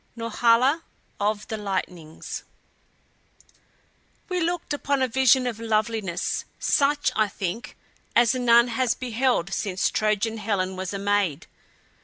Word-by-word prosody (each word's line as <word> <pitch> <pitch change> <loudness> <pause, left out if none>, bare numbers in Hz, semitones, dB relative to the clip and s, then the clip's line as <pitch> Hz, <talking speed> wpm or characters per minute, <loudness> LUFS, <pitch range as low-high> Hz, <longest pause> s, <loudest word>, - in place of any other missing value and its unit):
NORHALA 235 +6 +2 0.4
OF 210 +1 -1
THE 220 - -4
LIGHTNINGS 180 -6 -5 1.9
We 365 -1 -1
looked 340 -2 -1
upon 280 -2 0
a - - +2
vision 260 +1 +4
of 235 -3 -3
loveliness 220 -4 -1
such, 290 +1 +2
I 215 -1 +3
think, 200 +3 -5 0.4
as 235 0 +5
none 240 -1 +4
has 240 0 0
beheld 245 -6 0
since 190 -3 -1
Trojan 215 +1 0
Helen 195 -3 -1
was 185 -1 -4
a 200 - -3
maid. 200 -6 0
225 Hz, 120 wpm, -25 LUFS, 200-255 Hz, 1.9 s, as